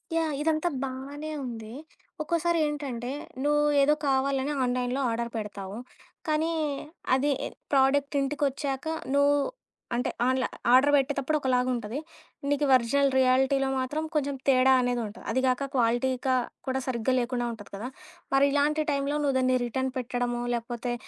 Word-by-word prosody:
Yeah! 320 -2 +1
ఇదంతా 315 +2 +1
బానే 275 +3 -5 0.2
ఉంది. 225 -3 -7 0.5
ఒక్కోసారి 335 +1 +1
ఏంటంటే, 270 -5 -3 0.3
నువ్వేదో 295 0 +4
కావాలని 270 +1 +1
ఆన్‌లైన్‌లో 250 +1 0
ఆర్డర్ 235 0 -2
పెడతావు. 205 -1 -6 0.5
కాని, 310 +2 +1 0.6
అది 280 +2 +2
ఎ - - -2 0.3
ప్రోడక్ట్ 280 +1 +3
ఇంటికొచ్చాక 275 0 -1 0.3
నువ్ 285 0 +4 0.6
అంటే, 245 - 0 0.2
ఆన్లా 260 0 +1 0.3
ఆర్డర్ 270 +3 +6
పెట్టేతప్పుడు 280 +2 0
ఒకలాగా 255 -1 +1
ఉంటది. 235 +4 -4 0.5
నీకు 290 0 +2
ఒరిజినల్ 270 +3 +2
రియాలిటీలో 265 +1 +3
మాత్రం 290 +5 -2
కొంచెం 285 -1 0
తేడా 265 0 +5
అనేదుంటది. 240 -3 -2
అది 260 - +1
కాక 255 +2 +1
క్వాలిటీగా 255 +2 +1 0.3
కూడా 260 0 0
సరిగ్గా 250 0 0
లేకుండా 240 0 -1
ఉంటది 220 -3 -10
కదా! 215 +5 -5 0.5
మరి 275 +1 +5
ఇలాంటి 295 +2 +2
టైంలో 280 +1 0
నువ్వు 275 -2 +1
దాన్ని 255 0 +3
రిటర్న్ 260 +2 -2
పెట్టడమో 245 0 -2
లేకపోతే 240 +1 -3
265 Hz, 130 wpm, -27 LUFS, 245-285 Hz, 0.6 s, ఆర్డర్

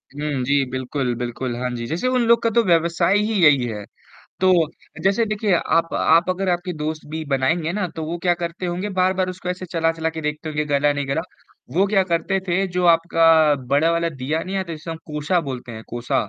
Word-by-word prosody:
हुँ। 145 -3 -2
जी 140 +1 +2
बिल्कुल, 130 0 -2
बिल्कुल। 120 +1 -4
हाँ 125 - -1
जी, 120 -1 -4
जैसे 170 - -2
उन 255 -1 +2
लोग 235 0 +5
का 230 - +3
तो 235 +1 +3
व्यवसाय 170 +2 +3
ही 210 +2 0
यही 140 -5 +5
है, 105 -3 -5 0.6
तो 185 0 +5 0.5
जैसे 200 +4 +2
देखिए 210 -1 -1
आप 165 0 0
आप 165 +3 +3
अगर 185 +1 -2
आपके 175 +1 -1
दोस्त 155 +1 -4
भी 160 0 -4
बनाएँगे 160 +5 0
ना, 205 -1 -1
तो 160 - -3
वो 165 +2 -3
क्या 175 -1 +3
करते 170 +2 -4
होंगे 180 +4 -3
बार-बार 185 0 +2
उसको 185 0 -7
ऐसे 180 +1 -4
चला-चला 165 -1 0
के 160 0 -6
देखते 150 +1 -4
होंगे 150 0 -1
कि - - -11
गला 145 +1 +3
नहीं 145 -1 -3
गला, 140 +4 0 0.5
वो 195 +2 +4
क्या 200 -1 +3
करते 185 +2 0
थे 185 +3 +1
जो 180 -1 -2
आपका 165 -2 +4
बड़ा 145 +5 +3
वाला 170 0 +1
दिया 150 +2 -3
नहीं 190 +1 -4
आता, 190 -3 -3
जिसे 160 +1 -7
हम 165 - -4
कोसा 150 +3 0
बोलते 125 -2 -7
हैं 110 0 -8
कोसा, 120 -3 -2
165 Hz, 215 wpm, -21 LUFS, 145-185 Hz, 0.6 s, लोग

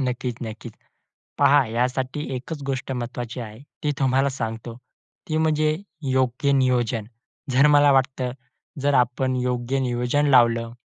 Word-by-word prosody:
नक्कीच, 125 -1 -3
नक्कीच! 110 0 -7 0.7
पहा, 145 0 +5
यासाठी 125 +5 -2
एकच 140 +4 -6
गोष्ट 135 -1 -3
महत्त्वाची 120 0 -5
आहे, 110 -2 -8 0.3
ती 150 - +1
तुम्हाला 135 +1 +2
सांगतो 115 -2 -5 0.5
ती 155 - -1
म्हणजे 155 -1 +2 0.3
योग्य 130 +2 +1
नियोजन. 125 -5 +1 0.4
जर 135 +3 +5
मला 145 -1 +6
वाटतं, 130 -1 +1 0.5
जर 145 0 +2
आपण 130 +1 +1
योग्य 125 +1 -1
नियोजन 125 +3 0
लावलं, 115 -2 +4
130 Hz, 125 wpm, -23 LUFS, 120-140 Hz, 0.7 s, मला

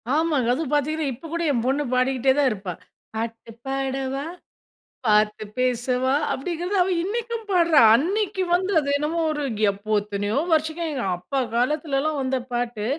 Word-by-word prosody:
ஆமாங்க. 305 -6 +1
அதுவும் 300 +1 -3
பார்த்தீங்கன்னா, 295 0 0
இப்ப 320 +7 -11
கூட 335 - -1
என் 235 -3 0
பொண்ணு 280 +3 +1
பாடிக்கிட்டே 260 +1 +2
தான் 275 -3 +4
இருப்பா. 195 -4 -5 0.4
"பாட்டு 230 +1 -5 0.2
பாடவா! 270 0 -2 0.8
பார்த்து 210 0 +3 0.2
பேசவா!" 255 +1 +1 0.2
அப்படிங்கிறத, 350 +6 -3
அவ 360 - +2
இன்னைக்கும் 460 +3 -3
பாடுறா. 340 -4 +5 0.2
அன்னைக்கு 380 - 0
வந்து, 375 +2 0
அது 280 -2 -3
என்னமோ 310 +3 -1
ஒரு 295 -1 -2 0.3
எப்போ 210 +2 -2
எத்தனையோ 205 +2 -2
வருஷம் 315 +1 +1
எங்க 275 -5 -3
அப்பா 270 +10 -3
காலத்திலல்லாம் 290 +4 0
வந்த 265 0 0
பாட்டு. 240 -3 -2
270 Hz, 145 wpm, -24 LUFS, 245-320 Hz, 0.8 s, பாடுறா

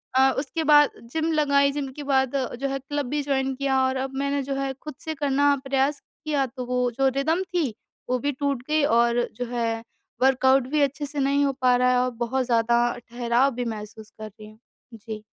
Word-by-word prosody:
अ, 265 0 +5
उसके 300 +4 -2
बाद 295 -1 +6 0.2
जिम 320 0 0
लगाई 280 -2 +3
जिम 275 -2 -4
के 290 - -5
बाद 265 0 +2 0.3
जो 275 - 0
है 275 0 -2
क्लब 290 +1 -3
भी 295 +2 -1
जॉइन 270 -1 0
किया 265 -1 +1
और 260 - -2
अब 270 - -8
मैंने 280 0 0
जो 275 0 -3
है 270 -1 -2
खुद 305 -3 -8
से 315 - -2
करना 285 0 +2
प्रयास 275 +2 +1 0.2
किया 290 -3 +1
तो 255 0 -7
वो 250 0 0
जो 270 +3 +1
रिदम 315 +6 +1
थी 350 -7 -1 0.4
वो 255 0 +1
भी 285 +4 -1
टूट 280 -2 -2
गई 305 -1 +2 0.2
और 235 0 +2
जो 245 - -3
है 230 -2 -1 0.4
वर्कआउट 265 0 +4
भी 300 +1 +1
अच्छे 285 +1 0
से 290 +1 -5
नहीं 280 +1 +2
हो 275 - +1
पा 250 -1 +4
रहा 250 0 +3
है 250 - +3
और 255 - +1 0.2
बहुत 260 +2 -1
ज़्यादा 235 -1 +2 0.3
ठहराव 240 +3 +1
भी 245 - -3
महसूस 215 -1 -7
कर 215 - -6
रही 215 0 -13
हूँ। 215 - -19 0.3
जी। 215 -1 -8
270 Hz, 215 wpm, -24 LUFS, 245-285 Hz, 0.4 s, बाद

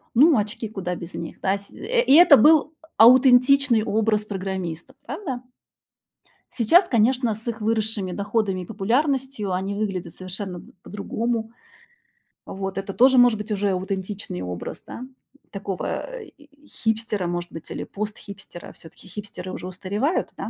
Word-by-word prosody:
Ну, 295 +4 +6
очки, 215 +2 -2
куда 185 -4 -4
без 170 0 -8
них, 165 - -7
да? 195 +1 +1
Сь 200 0 -14
э, 475 +4 0
и 485 - +4
это 340 -3 +9
был 310 +1 +5 0.2
а - - +7
аутентичный 255 -1 +6
образ 215 -1 +1
программистов, 190 -5 -5
правда? 275 - -5 1.1
Сейчас, 335 - +4
конечно, 240 0 +2
с 220 +3 -7
их 230 0 -4
выросшими 215 -3 -1
доходами 200 -1 -1
и - - -10
популярностью 245 - -1
они 190 +2 -2
выглядят 195 -5 -3
совершенно, 185 0 -7
м, - - -15
по-другому. 225 +2 -3 0.9
Вот 195 0 -5
это 195 0 -4
тоже 260 +1 +5
может 245 -2 +6
быть 210 +1 -6
уже 200 -1 0
аутентичный 190 - -4
образ, 90 -1 -6
да, 245 - -8 0.5
такого, 195 -2 -5 0.2
э, - - -8
и 290 0 -22
хипстера, 220 -4 -2
может 175 0 -4
быть, 165 - -9
или - - -4
пост-хипстера, 200 -3 -8
всё-таки 165 +3 -15
хипстеры 185 -1 -7
уже 180 - -6
устаревают, 200 - -2
да? - - -5
210 Hz, 150 wpm, -23 LUFS, 190-245 Hz, 1.1 s, это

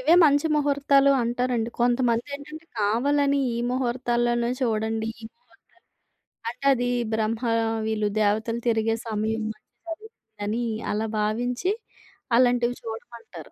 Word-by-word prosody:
ఇవే 310 +6 +5
మంచి 290 0 +4
ముహూర్తాలు 280 -1 +3
అంటారండి. 240 -1 0
కొంతమందేంటంటే 260 +6 0
కావాలని 280 +7 +2
ఈ - - -2
ముహూర్తాలల్లోన్నే 240 -1 0
చూడండి 220 -1 0
ఈ - - -8
ముహూర్తాలు. 485 - -31 0.7
అంటే 240 - -11
అది 245 -1 -1 0.3
బ్రహ్మ 220 +1 0 0.5
వీళ్ళు 215 -1 0
దేవతలు 220 +3 +1
తిరిగే 225 0 +2
సమయం 220 +1 -1
అంటారు 335 - -10 0.4
అని 230 +4 -1 0.3
అలా 220 +2 -1
భావించి 245 - 0 0.7
అలాంటివి 245 -1 +3
చూడమంటారు. 225 -3 -9
240 Hz, 105 wpm, -25 LUFS, 225-275 Hz, 0.7 s, ఇవే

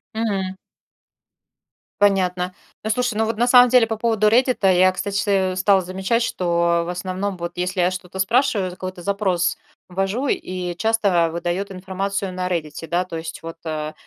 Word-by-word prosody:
М. 195 -4 -2 1.4
Понятно. 185 -2 +2 0.3
Ну, 220 - -2
слушай, 245 0 0
ну 225 - +2
вот 220 0 -2
на 240 - +2
самом 250 0 +7
деле 245 -2 +5
по 225 - -3
поводу 220 -2 +2
"Реддита", 235 -4 +3
я, 185 +1 +5
кстати, 195 -1 0
стала 190 +1 +3
замечать, 190 +6 -1
что 170 -4 +1
в 175 - -5
основном 185 +2 -3
вот 170 0 -5
если 180 +1 -1
я 180 - +2
что-то 185 0 -7
спрашиваю, 210 -3 +2
какой-то 185 0 -7
запрос 190 -2 0 0.3
ввожу 195 +9 -1
и 180 -6 -3
часто 200 -6 +2
выдает 175 +4 -3
информацию 190 +1 -3
на 180 0 -2
"Реддите", 160 -2 -4
да. 175 +1 0
То 165 -2 -6
есть 160 0 -7
вот, 165 0 -7
э, 155 -1 -3
185 Hz, 160 wpm, -21 LUFS, 180-210 Hz, 1.4 s, самом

